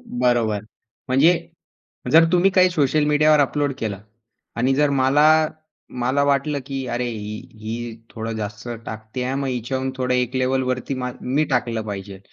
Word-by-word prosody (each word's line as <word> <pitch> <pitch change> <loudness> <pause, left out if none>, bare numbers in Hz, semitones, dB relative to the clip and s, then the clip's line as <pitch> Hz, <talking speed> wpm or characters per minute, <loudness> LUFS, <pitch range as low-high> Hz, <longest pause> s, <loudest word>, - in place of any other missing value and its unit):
बरोबर. 120 - 0 0.5
म्हणजे 150 +7 +4 0.7
जर 165 +1 +8
तुम्ही 180 +2 +4
काही 185 -1 +4
सोशल 150 -2 +2
मीडियावर 150 0 +4
अपलोड 145 +1 +1
केलं 100 -4 -3 0.6
आणि 130 +3 +2
जर 145 +1 +2
मला 150 +4 +4 0.5
मला 130 +3 +2
वाटलं 140 +1 +1
की 135 -2 -4
अरे, 120 0 -2
ही 105 -2 -5 0.2
ही 115 +1 -5
थोडं 115 0 -5
जास्त 105 +1 -6 0.2
टाकते 110 +3 -6
आहे, 130 +1 -2
मग 140 0 -2
हिच्याहून 130 +2 -2
थोडं 125 -1 0
एक 125 0 0
लेव्हलवरती 130 +1 0
म 125 -1 -3
मी 140 +5 +1
टाकलं 120 -3 0
पाहिजे. 100 -1 -6
130 Hz, 150 wpm, -22 LUFS, 115-145 Hz, 0.7 s, जर